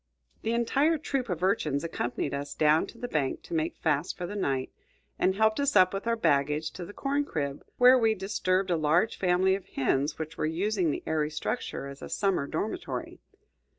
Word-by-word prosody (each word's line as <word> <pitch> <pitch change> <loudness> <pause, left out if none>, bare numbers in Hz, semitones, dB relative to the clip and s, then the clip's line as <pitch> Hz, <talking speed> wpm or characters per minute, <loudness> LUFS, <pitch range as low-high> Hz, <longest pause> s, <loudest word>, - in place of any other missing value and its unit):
The 225 - -1
entire 275 +7 +2
troop 275 -5 -2
of 180 -1 -3
urchins 155 -7 +1
accompanied 130 -4 -3
us 140 0 -4
down 155 +1 +3
to - - -13
the 245 - -4
bank 145 - -1
to - - -9
make 160 0 -1
fast 150 +1 0
for 175 - -4
the 205 - -6
night, 135 -9 -1 0.5
and 190 - +2
helped 220 +2 +2
us 280 -3 +1
up 185 -1 +6
with 195 +3 -4
our 230 - +2
baggage 150 -5 +1
to 180 - -7
the 205 - -9
corn 280 +6 -1
crib, 140 - -4
where 250 +1 +7
we 225 -2 +3
disturbed 185 -1 0
a 170 - +2
large 160 +8 +2
family 185 +1 +3
of 190 -1 -4
hens 135 0 0
which 160 0 -6
were - - +1
using 185 +2 0
the - - -3
airy 155 -1 0
structure 155 - -3
as 140 0 -9
a - - -7
summer 195 -8 0
dormitory. 215 - -4
180 Hz, 200 wpm, -28 LUFS, 150-220 Hz, 0.5 s, where